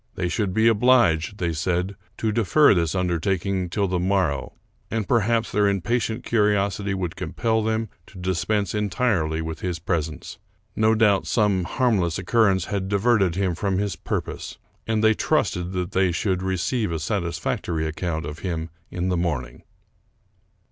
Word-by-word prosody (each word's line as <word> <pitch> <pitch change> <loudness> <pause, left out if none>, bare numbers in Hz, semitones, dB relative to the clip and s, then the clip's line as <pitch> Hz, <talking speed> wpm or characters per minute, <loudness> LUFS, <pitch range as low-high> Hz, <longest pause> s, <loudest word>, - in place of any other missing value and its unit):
They 90 -1 -1
should 100 0 -1
be 110 +4 +3
obliged, 110 -7 +3
they 85 -3 -1
said, 90 +5 -1 0.2
to 110 - 0
defer 120 +7 +4
this 85 -2 0
undertaking 90 +1 -1
till 100 +4 0
the 90 -1 -1
mor 95 -1 +2
row; 70 -1 -5 0.4
and 110 -3 -2
perhaps 115 0 +1
their 105 0 +3
impatient 110 +4 -1
curiosity 100 -2 +1
would 90 -2 -3
compel 110 +5 -1
them 110 +1 -1 0.2
to 100 - -14
dispense 95 +2 -1
entirely 100 -6 0
with 80 0 -5
his 90 -2 -3
presence. 80 -3 -3 0.4
No 110 +1 +3
doubt 105 -3 +3
some 100 -6 +2
harmless 100 - +1
occurrence 95 -1 +2
had 95 -2 -3
diverted 100 -3 +2
him 95 -2 0
from 95 +2 -1
his 100 -1 -1
purpose; - - -4 0.3
and 110 -1 0
they 110 0 +6
trusted 90 -4 0
that 90 -1 -2
they 95 -1 +2
should 95 +1 -1
receive 95 +3 -1
a 80 - -1
satisfactory 85 -2 -2
account 80 +1 -3
of 75 +1 -6
him 85 -3 -4 0.2
in 90 +1 -2
the 90 - +1
morning. 75 -8 -2
95 Hz, 155 wpm, -24 LUFS, 85-105 Hz, 0.4 s, they